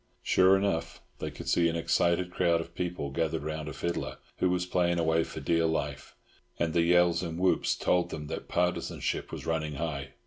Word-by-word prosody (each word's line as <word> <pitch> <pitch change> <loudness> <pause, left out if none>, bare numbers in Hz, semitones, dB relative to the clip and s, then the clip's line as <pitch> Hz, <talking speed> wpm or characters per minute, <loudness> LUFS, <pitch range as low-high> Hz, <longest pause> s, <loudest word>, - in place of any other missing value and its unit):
Sure 95 +1 +5
enough, 95 -4 -1 0.2
they - - -3
could - - -9
see 85 -1 +3
an 80 - -2
excited 85 +2 +1
crowd 85 -2 +2
of 85 0 -7
people 85 -6 -3
gathered 80 0 -1
round 75 0 -4
a - - -6
fiddler, 85 0 -3 0.2
who 90 - +3
was 90 0 0
playing 90 -1 +1
away 80 0 +2
for - - -7
dear 85 -1 +2
life, 75 -3 -3 0.4
and 80 -2 0
the 85 - +3
yells 85 0 +4
and 85 -2 -4
whoops 95 +1 +2
told 90 -1 +1
them 75 -1 -5
that - - -6
partisanship 90 +1 -1
was - - -6
running 75 -2 -1
high. 70 -3 -4
85 Hz, 195 wpm, -29 LUFS, 80-90 Hz, 0.4 s, Sure